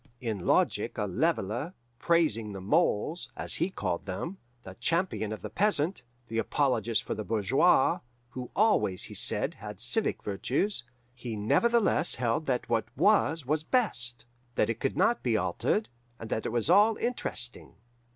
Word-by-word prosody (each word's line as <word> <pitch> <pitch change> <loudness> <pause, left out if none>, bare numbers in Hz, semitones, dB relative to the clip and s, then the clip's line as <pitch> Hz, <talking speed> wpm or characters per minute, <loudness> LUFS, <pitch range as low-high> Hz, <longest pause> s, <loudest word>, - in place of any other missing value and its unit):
In 110 -7 -4
logic - - +1
a - - 0
leveller, 120 - -1 0.2
praising 115 - +1
the 95 - -6
moles, 155 - 0
as - - +1
he 180 - 0
called 95 - -3
them, 165 - -5 0.2
the 95 - -9
champion 165 - 0
of 110 - -6
the - - -5
peasant, 190 -5 +1 0.3
the 115 0 -2
apologist 115 -5 0
for - - -3
the 110 - -4
bourgeois 125 - +3 0.3
who 125 -1 -7
always, 205 - +3
he - - -6
said, - - +1
had - - -9
civic - - 0
virtues 125 - -1 0.3
he 120 -2 -6
nevertheless 185 - +2
held 125 +5 -1
that 125 -2 -1
what 115 -1 +1
was 165 -4 +3
was 150 +3 0
best, 125 - +1 0.3
that - - +2
it 115 - -6
could 135 - -2
not 240 - +2
be 115 -3 +1
altered, 215 - 0 0.3
and 115 - -8
that 110 - -1
it - - -3
was 115 -2 +1
all 215 +2 +5
interesting. 230 - -2
125 Hz, 160 wpm, -29 LUFS, 110-175 Hz, 0.3 s, all